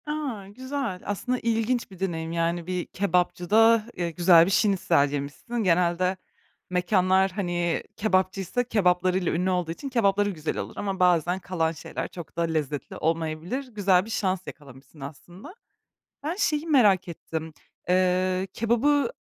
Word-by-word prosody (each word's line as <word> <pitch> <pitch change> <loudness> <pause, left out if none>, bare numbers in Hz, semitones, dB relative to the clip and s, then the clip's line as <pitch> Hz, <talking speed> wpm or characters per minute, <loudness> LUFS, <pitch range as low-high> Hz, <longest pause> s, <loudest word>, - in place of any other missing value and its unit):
A, 285 -10 -4
güzel! 255 -2 -4
Aslında 250 +5 -2
ilginç 230 0 -1
bir 190 - -13
deneyim, 165 -4 -3
yani, 170 0 -1
bir 180 -2 -2
kebapçıda, 200 +4 +2
eee, 175 -1 -3
güzel 170 0 +6
bir 190 - -1
şnitzel 190 -9 +2
yemişsin. 145 +12 -5
Genelde 180 +1 +2 0.5
mekânlar, 185 +1 +2
hani, 175 -3 -1
kebapçıysa 195 +2 0
kebaplarıyla 185 -5 +1
ünlü 180 +3 0
olduğu 180 -3 -1
için, 275 +11 -6
kebapları 205 -5 +2
güzel 160 -5 -4
olur - - -5
ama 195 -2 -3
bazen 180 0 +3
kalan 170 -3 -1
şeyler 160 - -6
çok 170 -3 -10
da - - +1
lezzetli 155 -4 -2
olmayabilir. 165 - -2
Güzel 195 -5 +2
bir - - -10
şans 190 -4 -1
yakalamışsın 140 +1 -12
aslında. 175 - -10 0.7
Ben 315 +4 -2
şeyi 315 -5 0
merak 210 - +4
ettim. 160 -1 -6 0.4
Iıı, 185 +1 +2
kebabı, 275 - +2
185 Hz, 135 wpm, -26 LUFS, 170-215 Hz, 0.7 s, güzel